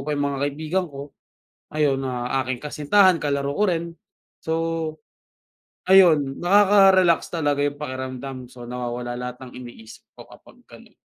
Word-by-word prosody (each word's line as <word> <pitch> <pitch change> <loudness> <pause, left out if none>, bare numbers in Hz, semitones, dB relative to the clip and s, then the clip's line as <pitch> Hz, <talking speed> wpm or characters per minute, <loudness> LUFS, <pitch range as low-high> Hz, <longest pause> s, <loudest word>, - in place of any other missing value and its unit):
pa 150 +2 -3
yung 145 - -1
mga 135 - -4
kaibigan 160 +5 -3
ko 140 0 -10 0.6
ayun, 150 -3 +1
ang 125 -1 -3 0.2
aking 130 -1 -4
kasintahan 165 +5 +3
kalaro 140 -2 -2
ko 210 - +2
rin. 170 -2 -2 0.4
So, 160 - -4 1.3
ayun, 165 -8 +4
nakaka-relax 190 -2 +4
talaga 145 -4 -1
yung 145 0 0
pakiramdam. 130 -2 -6
So, 125 0 -13
nawawala 120 0 -5
lahat 125 0 -5
ng 125 - -11
iniisip 120 -3 -13
ko - - -12
kapag - - -18
ganun. - - -17
145 Hz, 140 wpm, -23 LUFS, 130-170 Hz, 1.3 s, ayun